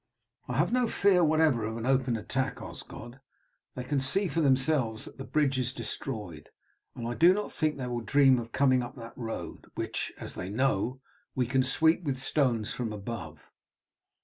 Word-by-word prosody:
"I - - -2
have - - +2
no 250 -1 +3
fear 195 -5 +4
whatever 155 -6 +3
of 110 +1 -3
an 115 - -4
open 130 -2 +2
attack, 130 +4 -2
Osgod. 120 +3 -9 0.6
They 125 - -4
can 140 +2 0
see 190 +9 +1
for 165 0 0
themselves 135 -5 +2
that - - -13
the - - -4
bridge 135 -2 +1
is 125 -1 -1
destroyed, 105 - -5 0.5
and 115 - -4
I 120 - -2
do 175 +7 +6
not 210 - -3
think 155 -2 0
they 130 - -4
will 120 -1 -2
dream 135 +3 +5
of 115 0 -7
coming 130 -1 +3
up 120 - -6
that 115 -3 -10
road, 115 -2 -6
which, - - -3
as - - -7
they 90 - -5
know, 130 +2 0 0.3
we 125 - +2
can 130 +3 +2
sweep 160 +6 +3
with 140 -6 -2
stones 130 -5 0
from 120 -3 -3
above. 100 -7 -7
130 Hz, 185 wpm, -29 LUFS, 115-145 Hz, 0.6 s, do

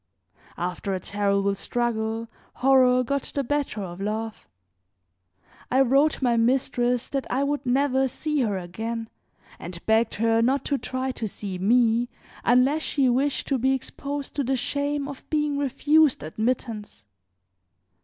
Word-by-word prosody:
After 180 +2 -2
a - - -3
terrible 200 0 0
struggle 225 +1 -2 0.3
horror 255 -1 +4
got 280 +2 -2
the 280 - +1
better 275 -6 -2
of 175 0 -7
love. 215 +2 -4 1.2
I 260 +2 +4
wrote 275 +3 +3
my 240 -2 +3
mistress 245 0 +1
that 275 -1 -2
I 265 +2 +1
would 285 0 -1
never 265 +1 +2
see 300 +4 -2
her 210 -5 0
again 225 +6 -5 0.5
and 170 -1 -8
begged 220 +1 +2
her 225 +1 +2
not 265 +4 +1
to 280 -2 0
try 260 0 -3
to 230 -3 -4
see 195 -2 -6
me 235 +3 +3 0.3
unless 255 +6 +3
she 275 -4 +1
wished 270 +3 +1
to 270 -2 +1
be 265 +3 +2
exposed 280 +2 -5
to 285 - +1
the 265 +1 0
shame 285 +2 -1
of 280 -2 -8
being 295 -2 0
refused 290 - +3
admittance. 215 - -3
250 Hz, 145 wpm, -25 LUFS, 220-275 Hz, 1.2 s, horror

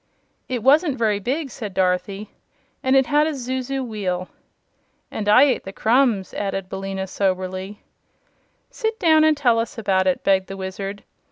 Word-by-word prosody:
"It 245 -4 -3
wasn't 285 +2 +4
very 215 -3 +1
big," 270 +6 -3
said 205 -5 -7
Dorothy; 190 +2 -1 0.5
"and 260 +1 +2
it 265 -1 +5
had 300 +2 +2
a 315 - -2
zuzu 260 +1 -3
wheel." 185 -5 -3 0.8
"And 210 -1 -3
I 250 +6 +7
ate 275 -3 +2
the 195 - -7
crumbs," 225 -2 +2
said 195 -2 -4
Billina, 195 0 -4
soberly. 190 +1 -3 0.9
"Sit 445 -3 -2
down 315 -4 +5
and 310 -1 +4
tell 240 -5 +3
us 230 +2 -4
about 190 -4 +1
it," 185 - 0
begged 190 -1 +2
the 195 - -7
Wizard. 195 +1 -6
210 Hz, 160 wpm, -22 LUFS, 190-265 Hz, 0.9 s, I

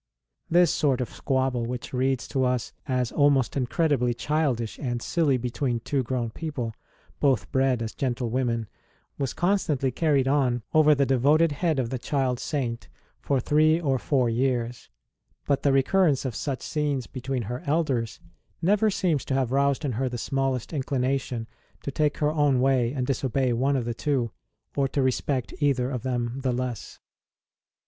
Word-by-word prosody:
This 175 -2 +4
sort 135 -4 +1
of 125 - -3
squabble, 130 -3 0
which 125 +1 -5
reads 130 0 0
to 135 -3 0
us 125 -3 -1
as 125 -3 0
almost 145 -4 +3
incredibly 130 -2 +1
childish 135 -5 -1
and 120 -4 -2
silly 145 0 +1
between 120 0 -2
two 135 +4 -1
grown 120 -2 -2
people, 130 -6 -4 0.5
both 125 -9 +1
bred 130 -3 +2
as 110 - -5
gentlewomen, 120 -2 -1 0.5
was 135 -3 -2
constantly 160 -7 +1
carried 140 -1 +2
on 130 -4 +1
over 155 -1 +6
the 140 0 +2
devoted 145 +5 +3
head 160 +1 0
of 125 -2 -1
the 130 - -2
child 130 -1 -1
Saint 125 -6 -3 0.3
for 135 - 0
three 155 +5 +3
or 135 -6 0
four 130 -3 +1
years; 120 0 -1 0.6
but 140 -2 +1
the 140 - +3
re 135 0 +4
currence 160 -5 +2
of 130 - -2
such 135 +2 -3
scenes 145 -4 -1
between 130 -1 -4
her 125 +6 -5
elders 140 -7 0 0.4
never 205 +5 +3
seems 175 -7 0
to 135 - -1
have 130 -3 0
roused 140 +2 +1
in 140 - 0
her 130 +3 -1
the 120 - -4
smallest 135 +2 -1
inclination 130 -4 -1 0.4
to 140 - -3
take 150 +1 0
her 150 0 +1
own 145 -4 +2
way 130 -2 +2
and 130 -2 -2
disobey 130 -1 0
one 135 +4 +1
of 125 -3 -1
the 120 - -2
two, 125 -2 -1 0.4
or 140 -1 +2
to 135 +1 0
respect 130 0 -1
either 135 -3 +1
of 125 -3 -3
them 120 0 -2
the 130 -1 0
less. 125 -2 -4
130 Hz, 170 wpm, -26 LUFS, 125-145 Hz, 0.6 s, over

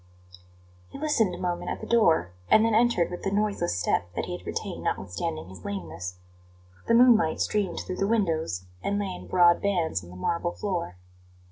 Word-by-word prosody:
He - - -9
listened 240 -11 +1
a - - -8
moment 175 -1 -2
at - - -3
the - - -7
door, 165 - +3 0.2
and 220 - +6
then 225 - +2
entered 225 -7 +3
with 180 - -6
the 195 - -1
noiseless 200 - 0
step 85 0 0
that - - -2
he - - -4
had - - -11
retained - - -4
notwithstanding 80 -2 -3
his 95 -2 -12
lameness. 90 -2 -5 0.7
The 230 - +4
moonlight 230 -10 +5
streamed 200 -5 0
through 185 - -5
the 195 - +1
windows, 165 - 0 0.2
and 200 - -1
lay 200 -2 -2
in - - -10
broad 175 -1 +5
bands 170 - 0
on 85 - -12
the 90 - -11
marble 170 - -1
floor. 175 - -3
175 Hz, 190 wpm, -27 LUFS, -, 0.7 s, and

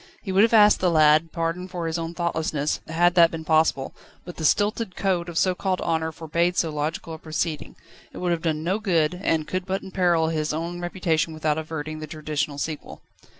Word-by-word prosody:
He 195 - -4
would 190 +1 +4
have 225 - +4
asked 210 -2 +6
the 185 - +2
lad's 155 0 +4
pardon 165 +2 -2
for 180 -2 -5
his 165 +1 -2
own 165 +1 -5
thoughtlessness, 160 -4 -1
had 175 +2 +3
that 170 -2 +6
been 160 -1 -7
possible: 155 -4 +2 0.3
but 175 - -9
the 160 - -3
stilted 205 +2 +1
code 180 -3 0
of 170 - -5
so 185 +1 +3
called 185 0 -1
honour 160 -1 -1
forbade 170 +3 -1
so 165 - +1
logical 155 +2 -3
a 160 - -8
proceeding. 155 0 -3 0.4
It - - -11
would 180 -1 -1
have 170 -1 0
done 155 -2 -1
no 185 +5 0
good, 180 -4 0
and 155 -2 +1
could 185 +3 -3
but 190 0 -2
imperil 175 -4 +1
his 155 -2 -1
own 170 +3 -4
reputation 165 -3 -1
without 155 0 0
averting 155 -1 -5
the 155 - -6
traditional 150 -1 -3
sequel. 155 +1 -6
165 Hz, 205 wpm, -24 LUFS, 155-180 Hz, 0.4 s, asked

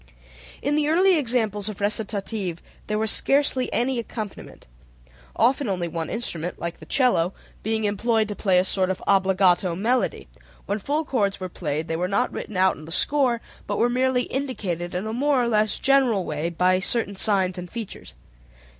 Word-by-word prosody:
In 285 - +1
the 300 0 +2
early 365 +4 +4
examples 225 - 0
of 210 - -7
recitative 205 -3 -1 0.3
there 210 - -1
was 220 0 0
scarcely 275 -2 +1
any 250 +1 +1
accompaniment, 215 -3 -7 0.7
often 260 -2 +2
only 180 -3 -1
one 165 -1 -4
instrument 175 -7 -2
(like 170 0 -5
the - - -12
cello) 195 -10 +2 0.3
being 220 0 0
employed 215 +2 +1
to 205 - -4
play 190 -3 +2
a 180 - +3
sort 190 -1 +1
of 190 - -3
obbligato 190 -2 +3
melody: 220 - 0 0.4
when 205 +2 -2
full 295 +9 -1
chords 205 -8 0
were 185 -1 -5
played 155 -2 -3
they 165 - -2
were 180 +2 -1
not 200 +1 0
written 210 - -5
out 190 0 +3
in 155 - -11
the 165 - -10
score, 255 - +2 0.3
but - - -2
were 240 - +3
merely 250 0 +1
indicated 190 -12 -3
in 185 +3 -2
a 220 - -3
more 280 +2 +2
or - - 0
less 215 -2 +2
general 255 -9 +3
way 155 +2 -2
by 180 +2 +2
certain 200 +1 0
signs 190 -2 +1
and 180 0 -7
figures. 215 - -7
210 Hz, 180 wpm, -24 LUFS, 185-245 Hz, 0.7 s, early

